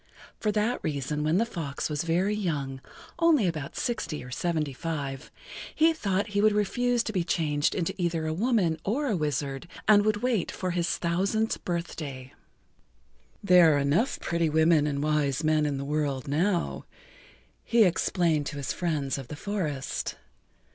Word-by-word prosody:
For 210 - +1
that 215 +4 0
reason 150 0 -2
when 155 +3 +2
the 230 - +3
fox 160 -11 -4
was 150 -1 -2
very 175 +5 +1
young, 145 -10 -2 0.4
only 325 - +4
about 155 -5 -3
sixty 220 - -2
or 125 - -10
seventy 155 0 -1
five, 140 -2 -4 0.5
he 320 +1 +4
thought 200 -8 -1
he 205 0 +1
would 215 0 +4
refuse 240 +4 +1
to 220 - -4
be 180 -3 +1
changed 150 -3 0
into 170 -3 -1
either 165 -2 0
a 155 - -1
woman 190 -4 +1
or 260 +9 0
a 235 -7 +1
wizard 145 -1 -2 0.2
and 205 -1 +6
would 215 0 0
wait 240 -7 +1
for 185 -1 -3
his 175 -1 0
thousandth 195 +6 0
birthday. 150 -7 -4 1.1
"There 180 -5 +6
are - - +2
enough 145 - +1
pretty 170 -1 0
women 160 -1 +4
and 140 -1 -1
wise 150 -1 +1
men 155 -1 +2
in 140 -2 -2
the 140 - -4
world 145 -3 -1
now," 170 +5 0 0.8
he 230 -1 +4
explained 170 -4 +1
to 150 - -5
his 140 -3 -3
friends 150 -6 -1
of 135 - -8
the 150 - -7
forest. 155 -7 -3
165 Hz, 165 wpm, -27 LUFS, 145-205 Hz, 1.1 s, and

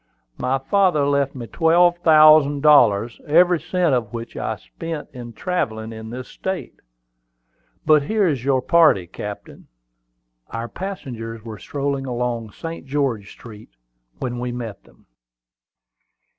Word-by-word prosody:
My 130 +2 0
father 175 0 +2
left 140 -1 0
me 120 -3 -6
twelve 175 +5 +3
thousand 155 -3 +6
dollars, 120 -7 +4
every 175 +3 +4
cent 180 -4 0
of 115 -5 -1
which 115 0 -7
I - - -3
spent 150 - -7
in 120 -2 -8
travelling 110 - -3
in 110 0 -9
this 125 +2 -7
state. 190 -1 -5 1.1
But 155 -1 +5
here 205 +6 +1
is 140 -7 -1
your 130 -2 +1
party, 155 - +4
captain." 105 +4 -9 0.8
Our 115 +1 -5
passengers 120 - -7
were 110 -3 -8
strolling 140 -1 -3
along 120 -2 -3
St. 165 +2 -8
George 130 -8 -1
Street 110 -3 -13 0.5
when 120 -2 -4
we 125 0 -3
met 120 -4 -7
them. - - -24
135 Hz, 130 wpm, -21 LUFS, 115-160 Hz, 1.1 s, thousand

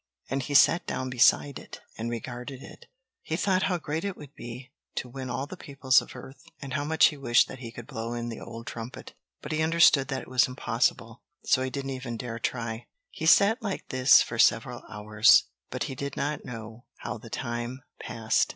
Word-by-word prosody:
and 135 0 0
he 145 +2 -4
sat 165 +5 +6
down 130 0 -3
beside 130 +2 +3
it - - -11 0.2
and 115 +1 -4
regarded 125 +3 -6
it. - - -13 0.3
He 160 - -3
thought 185 +1 +1
how 180 - +1
great 160 0 -4
it 200 -2 -3
would 145 -1 -12
be 125 +2 -9 0.2
to - - -3
win 130 +1 -7
all 130 +2 -2
the 165 - -9
peoples 135 -6 +2
of - - -12
earth, 130 +2 -11 0.2
and 140 -2 -7
how 145 -1 -1
much 160 +2 +4
he 150 - -9
wished 120 -4 +4
that 130 - -9
he 115 -3 -7
could 120 0 -9
blow 115 -3 -5
in 120 0 -4
the 115 - -6
old 115 0 -9
trumpet. 115 +1 -8 0.3
But 150 - -6
he 155 0 0
understood 160 -4 +5
that 135 -1 -3
it - - -14
was 125 -1 +3
impossible, 115 -2 -1 0.2
so 130 - +3
he 130 - -1
didn't 135 0 -4
even 125 -3 -5
dare 115 -1 -5
try. 115 -1 -3 0.2
He - - -3
sat 210 +4 +5
like 205 -4 -4
this 130 0 +6
for - - -6
several - - +3
hours, 105 +1 +5 0.3
but - - -3
he - - -4
did 140 +2 -5
not 145 +1 -2
know 115 0 -9 0.2
how - - -5
the - - -12
time 120 +1 -4 0.2
passed. 110 -1 0
130 Hz, 210 wpm, -27 LUFS, 120-140 Hz, 0.3 s, sat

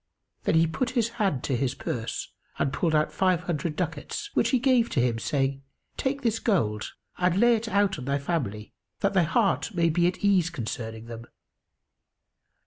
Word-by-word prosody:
Then - - +2
he 165 0 +5
put 235 +10 -1
his 230 -1 +2
hand 185 -11 +1
to 135 - 0
his 125 +1 -1
purse 115 -1 -4 0.3
and 135 - 0
pulled 165 -3 +1
out 150 0 +2
five 185 -2 +2
hundred 165 -3 -2
ducats, 180 - -4
which - - +2
he 260 - +3
gave 250 -2 +3
to 140 - 0
him 120 -2 +1
saying, 135 +2 -1 0.3
"Take 275 +1 -2
this 225 -2 +1
gold 110 - 0 0.3
and 180 +1 +2
lay 240 +1 +6
it 225 +1 -3
out 200 -5 +1
on 125 - -6
thy 140 +1 +1
family, 135 - -3 0.3
that 200 - +2
thy 190 - +4
heart 195 +4 +1
may 170 -1 +3
be 175 +2 +3
at 180 +3 -2
ease 185 -4 +4
concerning 115 -5 -5
them." 115 0 -8
170 Hz, 185 wpm, -27 LUFS, 135-200 Hz, 0.3 s, lay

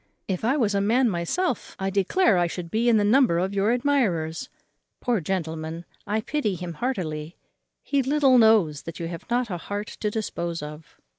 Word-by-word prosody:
If 190 0 -2
I 255 +6 +2
was 220 -7 +1
a 200 - +1
man 235 +3 +3
myself, 200 - -2
I 195 0 -2
declare 200 - +3
I 175 - +2
should 170 0 -6
be 235 +2 +2
in 230 - +5
the 210 - +3
number 225 -4 +4
of 190 +3 -1
your 200 +2 +1
admirers. 235 - 0 0.5
Poor 235 -6 0
gentleman, 165 -1 -3 0.2
I 215 +2 0
pity 215 -5 -1
him 175 -1 -6
heartily; 165 - -3 0.5
he 280 -1 +1
little 270 -1 +4
knows 210 -10 +4
that 165 -1 -8
you 165 - -3
have 170 +5 -8
not 240 -2 0
a 175 - -2
heart 205 +4 -5
to 210 - 0
dispose 170 -7 -3
of. 150 +1 -10
200 Hz, 190 wpm, -25 LUFS, 170-240 Hz, 0.5 s, in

